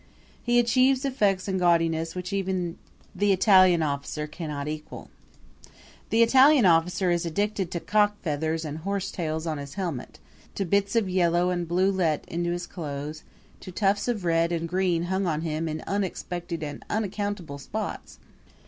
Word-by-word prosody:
He 240 0 +2
achieves 255 +3 +3
effects 205 -8 +1
in 190 -1 -1
gaudiness 165 -2 +2
which 180 +1 -5
even 185 -3 -2 0.4
time 205 0 +3
Italian 185 -3 +5
officer 145 +1 -3
cannot 150 -2 -5
equal. 155 0 -7 1.0
The 230 +1 +4
Italian 265 +1 +6
officer 175 +2 +3
is 170 -1 +1
addicted 195 +2 -1
to 175 - -3
cock 210 +2 +2
feathers 160 0 -1
and 150 +1 -5
horsetails 170 -4 -3
on 155 -3 -2
his 140 0 -8
helmet, 170 -10 -4 0.4
to 195 - -1
bits 200 +4 +1
of 225 -4 +2
yellow 180 -1 +2
and 175 -1 -2
blue 185 +3 +2
let 170 -6 0
into 175 +1 -2
his 175 0 -2
clothes, 150 -2 -6 0.4
to 185 - -9
tufts 200 +3 +1
of 220 -7 -2
red 165 0 +2
and 170 -1 -1
green 180 -1 0
hung 190 +2 -1
on 155 -2 -1
him 160 0 -2
in 155 0 -5
unexpected 175 -4 -3
and 145 -1 -6
unaccountable 205 -7 -3
spots. 130 - -6
175 Hz, 155 wpm, -26 LUFS, 160-195 Hz, 1.0 s, Italian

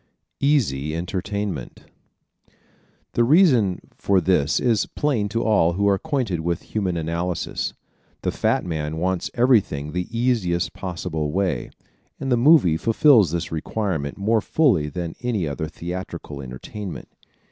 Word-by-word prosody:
Easy 85 - +1
Entertainment 95 - -4 0.7
¶ - - -36 0.6
The 120 - +3
reason 125 - +4 0.2
for 100 -1 +2
this 80 -4 +2
is 115 -5 +1
plain 120 -9 -1
to 115 +3 -1
all 95 -6 +3
who 100 +3 +1
are 100 - +5
acquainted 120 - -1
with 85 +1 -2
Human 95 -5 0
Analysis: 85 +2 -2 0.5
the - - 0
fat - - 0
man 80 -2 -3
wants 90 +1 -1
everything 105 - +2
the 90 +1 -2
easiest 115 -8 0
possible 85 -4 -3
way 90 -8 -1 0.5
and 135 - -3
the - - +5
movie 120 - +5
fulfils 115 - +5
this 85 +1 -3
requirement 80 -3 -2
more 110 +3 +2
fully 100 - +2
than 85 +2 -4
any 115 -9 -1
other 70 +2 -3
theatrical 85 -3 -6
entertainment. 75 +10 -7
95 Hz, 135 wpm, -23 LUFS, 80-115 Hz, 0.7 s, are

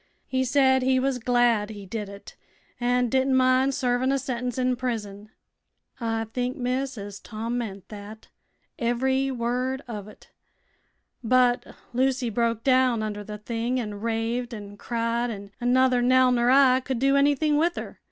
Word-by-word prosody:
He 260 0 0
said 260 0 +3
he 260 0 +2
was 265 -1 0
glad 240 -3 +2
he 205 -2 -8
did 210 +1 -5
it, 200 0 -12 0.4
an' 245 0 +2
didn't 265 +2 +2
mind 260 +1 +3
servin' 255 -1 +1
a 275 - +2
sentence 250 -2 -3
in 255 0 +1
prison. 215 -5 -4 0.7
I 225 -2 -1
think, 250 +2 -2
miss, 255 +1 -2
as 200 -1 -7
Tom 230 +2 -4
meant 200 -5 -6
thet 210 +1 -10 0.5
ev'ry 260 +3 +1
word 255 +2 -2
uv 210 -4 -6
it. 210 - -16 0.9
But 245 +1 +2 0.2
Lucy 255 -1 +1
broke 230 0 0
down 255 -4 +3
under 210 -1 -4
the 210 +1 -7
thing 235 +4 -2
an' 210 -4 -5
raved 230 +2 -2
an' 205 -1 -9
cried, 235 +2 -1
an' 200 -2 -7
nuther 250 0 +3
Nell 255 +1 +4
ner 240 0 +2
I 260 -1 +6
could 260 -1 -3
do 275 +3 +3
anything 290 +2 +3
with 335 +3 +2
her. - - -7
245 Hz, 160 wpm, -25 LUFS, 225-260 Hz, 0.9 s, I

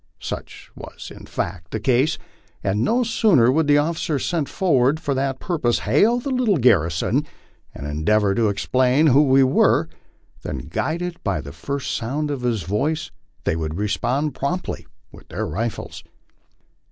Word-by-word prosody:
Such - - -7
was - - -10
in - - -12
fact 85 -3 -4
the 110 - -3
case, 130 +7 +2 0.5
and 100 +2 0
no 240 - +2
sooner 205 - +4
would 155 +2 +1
the 145 0 +5
officer 155 0 0
sent 155 +1 -1
forward 145 -5 +2
for 145 - -1
that 135 0 -1
purpose 150 -10 0
hail 235 +3 +3
the 275 +3 -4
little 245 -7 +2
garrison 90 - +2 0.5
and 70 - -7
endeavor 95 +8 +1
to 110 0 +2
explain 125 +8 +2
who 145 -1 +6
we 135 -2 +5
were, 130 - +3 0.5
than, 70 - -6
guided 170 - -3
by 95 -6 0
the 70 -1 -8
first 140 - -4
sound 145 +6 -2
of 140 -3 -3
his 120 -6 -1
voice, 145 - -1 0.3
they - - 0
would 80 0 -3
respond 125 +8 -1
promptly 175 +9 -3 0.2
with - - -15
their - - -3
rifles. 110 +7 -4
130 Hz, 155 wpm, -22 LUFS, 105-155 Hz, 0.5 s, who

